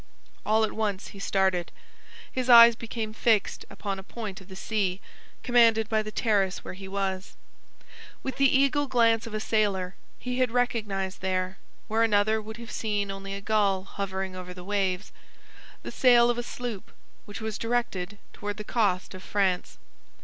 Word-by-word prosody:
All 220 +1 +4
at 220 - 0
once 205 -3 -2
he 200 - -11
started. 190 -3 +1 0.6
His 255 -1 -2
eyes 235 -1 +10
became 225 -1 -5
fixed 220 -2 +1
upon 195 -2 -4
a - - -9
point 210 -2 -7
of 190 - -15
the 190 - -10
sea, 195 -2 -1 0.4
commanded 230 -3 +4
by 220 -1 +2
the 215 0 -6
terrace 200 -5 +1
where - - -7
he 190 +1 -9
was. 190 -1 -3 0.9
With 265 -2 -4
the 275 -1 +5
eagle 275 +2 +3
glance 230 -3 +3
of 215 - -6
a - - -1
sailor 200 -4 0 0.2
he 250 0 -4
had 255 -1 +3
recognized 210 -6 -1
there, 185 0 -1 0.3
where 220 +1 +1
another 215 0 +3
would 220 +1 -8
have 235 0 -9
seen 205 -2 -1
only 195 0 -6
a 200 - -6
gull 200 -3 +1
hovering 190 -1 -4
over 180 0 -8
the 180 - -9
waves, 195 -1 -1 0.7
the - - -6
sail 240 -2 +5
of 240 - -3
a - - 0
sloop 240 -4 -6 0.3
which 205 0 -8
was 220 -1 -4
directed 225 -5 -2 0.2
toward 205 0 -5
the 210 - -5
coast 205 -5 0
of 185 - -9
France. 190 -2 -1
210 Hz, 170 wpm, -27 LUFS, 190-230 Hz, 0.9 s, eyes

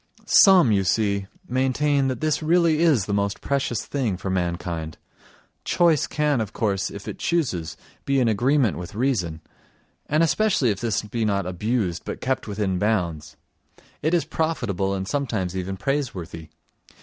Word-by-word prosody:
Some, 185 - +6
you 100 -2 +2
see, 100 0 0 0.2
maintain 135 +1 +1
that 130 -2 -3
this 155 0 0
really 165 -1 +3
is 155 - +3
the 100 - -3
most 100 0 -1
precious 140 -4 -1
thing 120 -10 -2
for 95 +1 -4
mankind; 85 -3 -3 0.7
choice 170 -4 +2
can, 150 -4 0
of 105 -2 -5
course, 100 -2 -1
if 100 - -9
it - - -6
chooses, 90 - -1 0.3
be 140 -1 +1
in 125 - +2
agreement 120 - +2
with 90 +4 -8
reason; 100 -11 -1 0.7
and 155 +3 +2
especially 165 - +2
if 100 - -4
this 115 -3 0
be 110 +2 -3
not 100 -3 0
abused 95 0 -2
but - - -6
kept 130 -2 -2
within 100 -3 -1
bounds. 85 -8 -1 0.6
It 155 +4 +2
is 170 - +1
profitable 100 - -1
and 95 0 -4
sometimes 110 -9 -2
even 95 +1 -3
praiseworthy. 95 - -3
110 Hz, 155 wpm, -24 LUFS, 95-140 Hz, 0.7 s, Some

